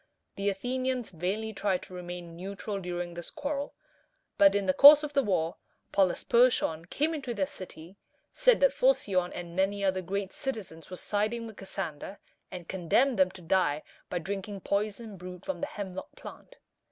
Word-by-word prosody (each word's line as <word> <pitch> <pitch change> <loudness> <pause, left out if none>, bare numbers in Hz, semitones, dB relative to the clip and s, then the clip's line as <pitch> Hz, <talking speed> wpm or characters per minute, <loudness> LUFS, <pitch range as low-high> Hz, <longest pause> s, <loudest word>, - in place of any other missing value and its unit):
The 200 +1 0
Athenians 250 +4 -2
vainly 195 +6 -2
tried 195 -2 0
to - - -12
remain 175 -1 -7
neutral 200 +3 -5
during 175 -1 -4
this 170 0 -7
quarrel; 285 0 -4 0.6
but 200 0 +7
in 200 -1 +1
the 185 - +3
course 290 +5 +10
of 295 -1 -4
the 280 - +4
war, 175 -8 0 0.3
Polysperchon 195 -3 +3
came 300 - 0
into 270 -6 -4
their 195 -2 +1
city, 185 0 -10 0.4
said - - +4
that - - +5
Phocion 195 - +2
and 170 -1 -7
many 195 +2 +1
other 190 -1 +1
great 195 +2 -3
citizens 210 - -6
were 185 - -6
siding 215 +5 -1
with 220 -2 -10
Cassander, 190 -1 -6 0.3
and 175 -2 -8
condemned 195 +7 +2
them 185 -1 +5
to 185 -1 -13
die 160 -4 +1 0.3
by 180 - -2
drinking 195 +2 -4
poison 210 +2 -2
brewed 180 0 -9
from 285 - -3
the 285 - -1
hemlock 190 -6 -7
plant. - - -11
195 Hz, 165 wpm, -29 LUFS, 180-230 Hz, 0.6 s, course